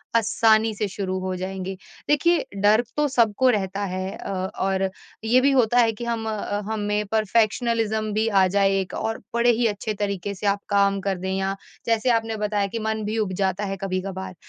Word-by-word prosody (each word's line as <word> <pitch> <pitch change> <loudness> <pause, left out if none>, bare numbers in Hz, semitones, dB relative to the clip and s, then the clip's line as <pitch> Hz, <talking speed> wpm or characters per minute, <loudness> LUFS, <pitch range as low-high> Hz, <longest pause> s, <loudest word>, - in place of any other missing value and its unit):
आसानी 225 0 +3
से 210 0 -1
शुरू 190 -1 -3
हो 185 0 -3
जाएँगे। 190 +1 -5 0.3
देखिए 330 +4 +3 0.2
डर 215 +3 +5
तो 295 0 +3
सबको 245 -1 +3
रहता 200 -3 0
है 185 0 -3
अ, - - -6 0.3
और 190 0 +1 0.3
ये 240 +3 +4
भी 280 +2 +4
होता 245 -2 +3
है 230 -1 +4
कि 235 +3 -7
हम 230 -1 -2
अ, 205 -1 -3
हमें 210 0 -1
परफेक्शनिज़्म 220 0 +1
भी 215 +2 +1
आ 195 -3 +4
जाए 195 0 +2
एक 185 - -7
और 225 0 -2 0.2
बड़े 235 +1 +4
ही 235 0 +2
अच्छे 210 +1 -3
तरीके 200 -1 -3
से 205 - -3
आप 200 0 +1
काम 200 -1 +3
कर 190 -2 0
दें 190 +1 -3
या 195 0 -1 0.3
जैसे 230 +2 +1
आपने 225 -1 0
बताया 210 -1 0
कि 225 +3 -4
मन 220 0 -2
भी 215 +2 -2
उब 210 -4 0
जाता 190 +1 0
है 195 0 -3
कभी-कभार। 190 -1 -4
210 Hz, 195 wpm, -24 LUFS, 195-225 Hz, 0.3 s, डर